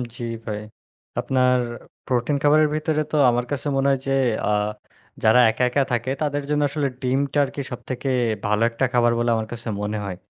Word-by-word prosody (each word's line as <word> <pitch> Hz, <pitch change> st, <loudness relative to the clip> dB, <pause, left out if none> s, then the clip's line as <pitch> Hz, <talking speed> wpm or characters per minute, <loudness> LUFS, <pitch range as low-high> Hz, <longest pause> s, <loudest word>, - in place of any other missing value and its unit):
জ্বি 120 Hz, -, -5 dB, 0.2 s
ভাই। 105 Hz, -1 st, -3 dB, 0.6 s
আপনার 125 Hz, -1 st, +2 dB, 0.5 s
প্রোটিন 125 Hz, +3 st, 0 dB
খাবারের 150 Hz, +1 st, +5 dB
ভিতরে 155 Hz, 0 st, 0 dB
তো -, -, -1 dB
আমার 120 Hz, 0 st, 0 dB
কাছে 145 Hz, +1 st, -2 dB
মনে 135 Hz, +1 st, +2 dB
হয় 135 Hz, -, +1 dB
যে, -, -, 0 dB, 0.4 s
আ -, -, +1 dB, 0.7 s
যারা 110 Hz, +3 st, +6 dB
একা, 110 Hz, +3 st, -1 dB
একা 140 Hz, +3 st, +2 dB
থাকে 120 Hz, +1 st, -1 dB
তাদের 145 Hz, -1 st, -1 dB
জন্য 150 Hz, 0 st, +1 dB
আসলে 145 Hz, 0 st, -1 dB
ডিমটা 135 Hz, +3 st, 0 dB
আরকি 140 Hz, -, -6 dB
সবথেকে 130 Hz, +2 st, -4 dB, 0.4 s
ভালো 105 Hz, +1 st, +1 dB
একটা 115 Hz, +3 st, 0 dB
খাবার 120 Hz, -1 st, +4 dB
বলে 120 Hz, 0 st, +1 dB
আমার 110 Hz, -1 st, -2 dB
কাছে 120 Hz, 0 st, -7 dB
মনে 105 Hz, +1 st, -2 dB
হয়। 95 Hz, -2 st, -4 dB
125 Hz, 180 wpm, -23 LUFS, 120-145 Hz, 0.7 s, যারা